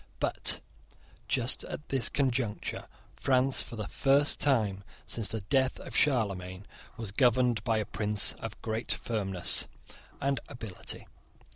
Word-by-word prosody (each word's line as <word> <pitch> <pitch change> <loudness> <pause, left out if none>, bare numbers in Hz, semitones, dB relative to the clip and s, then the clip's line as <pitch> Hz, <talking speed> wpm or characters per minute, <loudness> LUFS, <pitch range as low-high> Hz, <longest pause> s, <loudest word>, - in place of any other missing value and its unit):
But, - - +2 0.7
just 125 0 +2
at 150 - -7
this 135 -3 +2
conjuncture, 125 -6 -1 0.3
France, 130 0 +3
for - - -6
the 105 -2 -4
first 140 +1 +2
time 105 -9 +2 0.2
since 110 +1 -1
the 110 - -3
death 130 +6 +1
of - - -8
Charlemagne, 100 -8 +1 0.3
was 110 -4 -4
governed 120 -1 +3
by 115 -2 +1
a 110 - 0
prince 105 0 +2
of - - -7
great 110 +1 -2
firmness 95 -6 +2 0.5
and 140 -1 0
ability. 110 -6 -6
115 Hz, 130 wpm, -30 LUFS, 105-130 Hz, 0.7 s, France